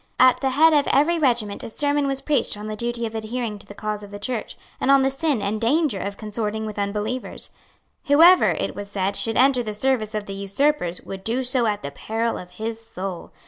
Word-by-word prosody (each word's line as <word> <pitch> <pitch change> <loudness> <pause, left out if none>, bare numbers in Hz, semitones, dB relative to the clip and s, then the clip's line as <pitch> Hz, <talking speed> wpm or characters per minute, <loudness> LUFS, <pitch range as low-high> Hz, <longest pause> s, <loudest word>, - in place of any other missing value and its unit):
At 255 -1 +6
the 270 - +2
head 315 +5 +5
of 290 -1 +3
every 325 +5 +3
regiment 235 -8 +1
a - - -6
sermon 285 +3 0
was 270 0 -2
preached 280 -8 0
on 210 - -7
the 215 0 -4
duty 235 +1 -2
of 225 - -5
adhering 220 -1 -4
to - - -12
the 205 - -11
cause 210 0 -3
of 205 - -10
the 205 - -7
Church, 220 +2 -4 0.2
and - - 0
on 275 -1 +6
the 270 - +2
sin 270 -5 0
and 210 +2 -2
danger 270 - +2
of 200 0 -4
consorting 215 0 -3
with 210 -1 -5
unbelievers. 210 +5 -3 0.5
Whoever, 330 +5 +7
it - - -2
was 205 0 -7
said, 195 0 -1
should 225 - -2
enter 260 0 +4
the 215 -3 -4
service 220 -2 0
of 210 -1 -2
the 195 - -6
usurpers 200 - 0
would 190 0 -8
do 240 +5 -1
so 250 -2 +2
at 205 -5 -1
the 140 - -4
peril 225 +10 -2
of 180 - -10
his 225 +1 -4
soul. 190 -5 -6
225 Hz, 225 wpm, -23 LUFS, 205-265 Hz, 0.5 s, Whoever